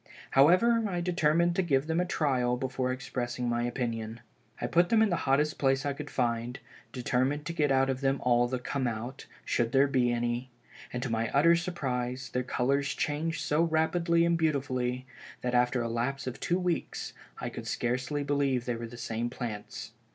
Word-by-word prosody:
However, 200 +12 +5
I 175 -2 -1
determined 170 -1 +2
to 190 - +3
give 140 -6 +1
them 160 +1 0
a 180 - +2
trial 125 -7 +1
before 130 0 -1
expressing 125 -1 -3
my 120 0 0
opinion. 115 -2 -3 0.4
I - - -2
put 175 +1 +3
them 220 -1 +5
in 215 - +2
the - - +3
hottest 150 +3 +2
place 135 0 +2
I 140 - 0
could 145 +1 -7
find, 120 0 -1 0.3
determined 130 +4 0
to 170 - -3
get 150 -4 +1
out 135 0 +4
of 130 0 -2
them 135 0 +1
all 120 -1 +4
the 130 +1 -2
'come 130 +1 -2
out,' 120 +3 -5 0.2
should 120 -1 0
there 135 +1 +6
be 130 -3 +2
any, 120 +1 -1 0.4
and 125 0 -3
to 125 - -2
my 115 0 0
utter 170 +5 +5
surprise, 130 -8 -3
their 125 - +1
colors 135 +2 0
changed 160 +2 -1
so 150 +2 +1
rapidly 170 +1 +2
and 170 -1 +2
beautifully, 130 -5 0 0.4
that 125 0 -2
after 125 0 +2
a - - -1
lapse 120 +4 -2
of 130 -1 -5
two 175 - +1
weeks, 180 -2 -2 0.3
I - - -3
could - - -8
scarcely 130 +4 -1
believe 140 -3 +1
they 120 - -1
were 115 0 -5
the 120 +1 -11
same 115 0 -2
plants. 115 -4 -6
135 Hz, 190 wpm, -29 LUFS, 125-155 Hz, 0.4 s, there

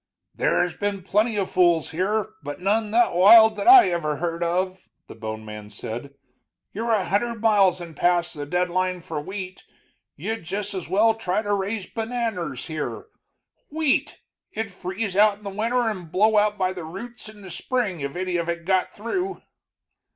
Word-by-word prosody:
"There's 175 -2 +1
been 205 -2 -3
plenty 215 +4 +1
of 195 -2 -1
fools 175 -3 +3
here, 200 +5 -1
but 145 -1 -6
none 210 +4 +1
that 230 0 +3
wild 220 +5 +8
that 205 - -3
I 370 - +9
ever 155 -3 -1
heard 170 +1 -3
of," 185 +2 -2 0.2
the - - -11
bone 110 0 -6
man 105 -1 -9
said. 120 +6 -7 0.6
"You're 230 +3 -2
a 200 -4 +1
hundred 225 +5 -1
miles 200 -5 +3
and 170 -1 -8
more 155 - -14
past 175 -1 +2
the 145 -2 -6
deadline 180 +2 0
for 160 -2 -5
wheat 185 +2 -7 0.5
you'd 220 +7 -4
just 200 +4 -4
as 185 -4 -5
well 215 +4 +4
try 215 -2 -2
to 205 -1 -1
raise 200 0 -2
bananers 220 - -3
here. 155 - -5 0.6
Wheat! 310 -2 0 0.3
it'd 220 -2 -4
freeze 190 +2 -4
out 205 0 +5
in 210 - -21
the 200 - -5
winter 230 +4 0
and 185 -7 -4
blow 215 +4 +3
out 210 0 +3
by 185 -1 0
the 180 -2 -7
roots 215 +8 -8
in 210 -1 -14
the 190 - -9
spring 230 -9 -2
if 140 0 -4
any 180 -1 -1
of 170 0 -2
it 170 0 -3
got 185 0 +1
through." 365 - -4
190 Hz, 180 wpm, -24 LUFS, 175-220 Hz, 0.6 s, I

